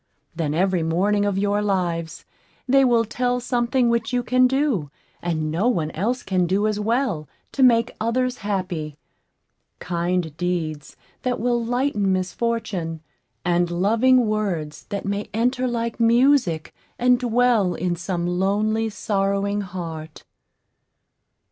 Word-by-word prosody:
Then, 155 Hz, -2 st, -1 dB
every 185 Hz, 0 st, +2 dB
morning 195 Hz, +6 st, +1 dB
of 200 Hz, -2 st, 0 dB
your 205 Hz, +1 st, +1 dB
lives, 175 Hz, -5 st, -2 dB, 0.4 s
they 270 Hz, +1 st, +5 dB
will 235 Hz, -3 st, +3 dB
tell 245 Hz, +3 st, -1 dB
something 245 Hz, 0 st, +1 dB
which 235 Hz, 0 st, 0 dB
you 245 Hz, -1 st, 0 dB
can 255 Hz, +1 st, +4 dB
do, 265 Hz, -, 0 dB, 0.3 s
and 155 Hz, -3 st, -2 dB
no 180 Hz, +9 st, +1 dB
one 165 Hz, -11 st, 0 dB
else 235 Hz, +9 st, -2 dB
can 180 Hz, -2 st, +1 dB
do 195 Hz, +4 st, +1 dB
as 215 Hz, -1 st, 0 dB
well, 215 Hz, -, 0 dB, 0.2 s
to 275 Hz, -, -2 dB
make 235 Hz, -2 st, +4 dB
others 250 Hz, +3 st, 0 dB
happy 180 Hz, -7 st, -3 dB, 0.8 s
kind 175 Hz, -2 st, -2 dB
deeds 165 Hz, -4 st, -3 dB, 0.2 s
that 250 Hz, -1 st, -1 dB
will 240 Hz, +1 st, +1 dB
lighten 240 Hz, -4 st, 0 dB
misfortune, 185 Hz, -3 st, -2 dB, 0.4 s
and 175 Hz, 0 st, +2 dB
loving 230 Hz, +8 st, +3 dB
words 195 Hz, -8 st, -2 dB
that 200 Hz, -, -5 dB
may 200 Hz, +1 st, -3 dB
enter 250 Hz, +3 st, +1 dB
like 235 Hz, -1 st, -2 dB
music, 235 Hz, -, +3 dB, 0.2 s
and 250 Hz, 0 st, +3 dB
dwell 240 Hz, -6 st, +2 dB
in 175 Hz, +1 st, -1 dB
some 175 Hz, 0 st, -3 dB
lonely, 205 Hz, +5 st, 0 dB
sorrowing 200 Hz, 0 st, -1 dB
heart. 165 Hz, -4 st, -7 dB
205 Hz, 130 wpm, -23 LUFS, 175-240 Hz, 0.8 s, they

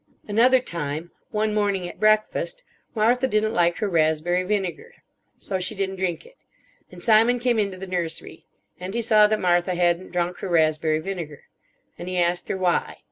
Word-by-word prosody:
"Another 240 Hz, +5 st, +4 dB
time. 165 Hz, -, -5 dB, 0.2 s
One 215 Hz, 0 st, -1 dB
morning 200 Hz, -3 st, 0 dB
at 175 Hz, -, -11 dB
breakfast. 215 Hz, -, +1 dB, 0.3 s
Martha 240 Hz, +4 st, +2 dB
didn't 215 Hz, -2 st, 0 dB
like 175 Hz, -2 st, +2 dB
her 215 Hz, -, -1 dB
raspberry 165 Hz, 0 st, +1 dB
vinegar. 205 Hz, -, -3 dB, 0.4 s
So 190 Hz, -2 st, -4 dB
she 185 Hz, +4 st, -2 dB
didn't 190 Hz, -1 st, -3 dB
drink 185 Hz, -, -2 dB
it. -, -, -18 dB, 0.5 s
And 180 Hz, -1 st, -9 dB
Simon 230 Hz, +2 st, +4 dB
came 245 Hz, -2 st, +1 dB
into 200 Hz, -3 st, -1 dB
the 190 Hz, -, -7 dB
nursery. 175 Hz, -3 st, -4 dB, 0.3 s
And 185 Hz, +4 st, -6 dB
he 235 Hz, -, -1 dB
saw 215 Hz, -2 st, +5 dB
that 215 Hz, 0 st, 0 dB
Martha 175 Hz, 0 st, +1 dB
hadn't 175 Hz, +1 st, +1 dB
drunk 175 Hz, 0 st, -2 dB
her 195 Hz, -, -5 dB
raspberry 155 Hz, -2 st, +2 dB
vinegar. 170 Hz, -6 st, -6 dB, 0.6 s
And 175 Hz, -, -7 dB
he 185 Hz, 0 st, -3 dB
asked 175 Hz, 0 st, 0 dB
her -, -, -1 dB
why. 180 Hz, -2 st, 0 dB
185 Hz, 175 wpm, -24 LUFS, 175-215 Hz, 0.6 s, saw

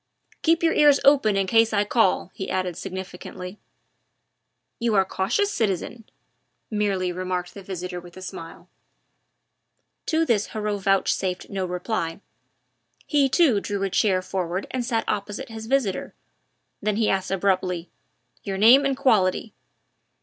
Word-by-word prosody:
"Keep 330 Hz, +1 st, +2 dB
your 325 Hz, -, +3 dB
ears 290 Hz, -2 st, +5 dB
open 265 Hz, -8 st, +5 dB
in 195 Hz, -, +2 dB
case 225 Hz, +3 st, +3 dB
I 205 Hz, -1 st, +3 dB
call," 205 Hz, -4 st, +1 dB
he 190 Hz, -, -6 dB
added 185 Hz, -2 st, -1 dB
significantly. 185 Hz, +1 st, -7 dB, 1.2 s
"You 230 Hz, -2 st, +1 dB
are 190 Hz, -1 st, +4 dB
cautious, 235 Hz, -, 0 dB
citizen," 220 Hz, +2 st, -2 dB, 0.7 s
merely 200 Hz, -4 st, 0 dB
remarked 180 Hz, 0 st, -3 dB
the 200 Hz, -, -9 dB
visitor 180 Hz, -1 st, -5 dB
with 175 Hz, +1 st, -14 dB
a 185 Hz, -, -9 dB
smile. 175 Hz, -3 st, -9 dB, 1.4 s
To 325 Hz, +1 st, +2 dB
this 215 Hz, -7 st, +1 dB
Heriot 210 Hz, -1 st, -2 dB
vouchsafed 190 Hz, -1 st, 0 dB
no 190 Hz, -2 st, -2 dB
reply. 180 Hz, -2 st, -3 dB, 0.9 s
He, 285 Hz, -3 st, +2 dB
too, 270 Hz, -, +4 dB
drew 200 Hz, -1 st, -3 dB
a 195 Hz, -, -1 dB
chair 190 Hz, -1 st, +2 dB
forward 185 Hz, 0 st, -3 dB
and 255 Hz, -1 st, -2 dB
sat 235 Hz, -2 st, -1 dB
opposite 210 Hz, +5 st, -3 dB
his 220 Hz, 0 st, -8 dB
visitor, 255 Hz, -7 st, -1 dB, 0.7 s
then 210 Hz, -1 st, 0 dB
he 220 Hz, 0 st, +1 dB
asked 190 Hz, -1 st, 0 dB
abruptly: 185 Hz, -2 st, 0 dB, 0.5 s
"Your 195 Hz, -1 st, -4 dB
name 245 Hz, +7 st, +7 dB
and 275 Hz, -1 st, 0 dB
quality?" 210 Hz, -4 st, +2 dB
200 Hz, 140 wpm, -24 LUFS, 185-230 Hz, 1.4 s, name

